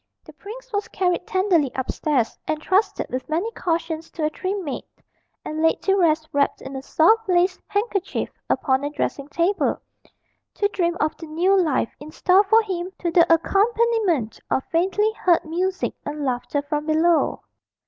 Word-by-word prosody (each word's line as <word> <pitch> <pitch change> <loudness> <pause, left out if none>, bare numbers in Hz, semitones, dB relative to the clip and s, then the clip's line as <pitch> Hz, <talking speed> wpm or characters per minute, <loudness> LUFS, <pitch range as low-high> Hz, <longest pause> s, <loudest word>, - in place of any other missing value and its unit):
The - - -14
prince - - -11
was 410 0 -1
carried 360 -1 -1
tenderly 370 -7 +2
upstairs, 260 -1 -1
entrusted 370 +7 0
with 255 +3 -4
many 345 +9 -1
cautions 330 -4 -2
to 315 - -2
a 305 - 0
trim 380 +3 -3
maid, 280 - -4 0.6
and 310 +1 -3
laid 325 0 +3
to 390 - +3
rest 315 -4 +2
wrapped 280 0 +1
in 270 +1 -8
a 265 - -4
soft 395 +10 +3
lace 360 +1 +2
handkerchief 405 -2 -1 0.2
upon 265 0 +1
a 290 - -1
dressing 290 -1 -3
table, 340 +6 0 0.8
to 410 - +2
dream 345 -3 -1
of 310 - 0
the 325 - -9
new 350 +6 +2
life 315 -11 +1
in 295 - -10
store 370 +4 +4
for 445 +3 +5
him 365 -3 -3
to 345 - -2
the 335 0 +4
accompaniment 400 - +2
of 265 - +1
faintly 385 +6 +2
heard 345 -2 +3
music 365 +4 -1
and 295 0 -4
laughter 260 +3 -1
from 295 +1 -3
below. 320 +2 +2
340 Hz, 165 wpm, -23 LUFS, 305-390 Hz, 0.8 s, for